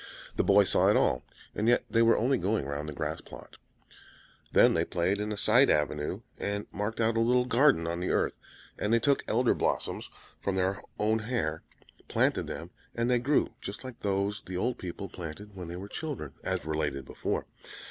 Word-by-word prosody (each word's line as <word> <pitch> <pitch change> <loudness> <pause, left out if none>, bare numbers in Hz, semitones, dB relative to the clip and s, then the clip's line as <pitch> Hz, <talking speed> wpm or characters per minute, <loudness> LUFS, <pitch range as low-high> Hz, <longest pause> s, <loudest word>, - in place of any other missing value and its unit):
The - - +2
boy 100 +1 +6
saw - - +3
it - - +5
all, 60 - +2 0.3
and 105 - -1
yet 120 - +4
they 115 - +2
were 115 0 +5
only 130 +2 +2
going 105 -5 0
round 70 +2 -4
the - - -4
grass - - -3
plot. - - -12 0.9
Then - - +6
they 80 - +2
played 90 +4 0
in 105 +1 -2
a 105 - -3
side 120 +6 +5
avenue, 75 0 0 0.2
and 100 0 -2
marked 105 +3 -3
out 115 0 +2
a - - +3
little 125 +2 +3
garden 125 - +4
on 85 +1 -2
the 90 - -2
earth; - - 0 0.4
and 105 - 0
they 115 - +5
took 140 +4 +2
Elder 120 +2 +3
blossoms - - -2 0.3
from 100 - -1
their 95 +1 0 0.2
hair, 110 -6 0 0.5
planted - - +1
them, - - -6 0.2
and 115 +1 +1
they 125 - +4
grew 140 +5 +1
just 100 +5 -7
like 130 -2 -8
those 100 +1 -1
the 90 -1 -4
old 120 +6 -1
people 95 +2 -5
planted 95 +5 -8
when 90 -3 -7
they 85 - -6
were 95 +2 -7
children, 130 - -5
as 95 -3 -2
related 75 -4 -2
before. - - -3
100 Hz, 195 wpm, -29 LUFS, 85-115 Hz, 0.9 s, boy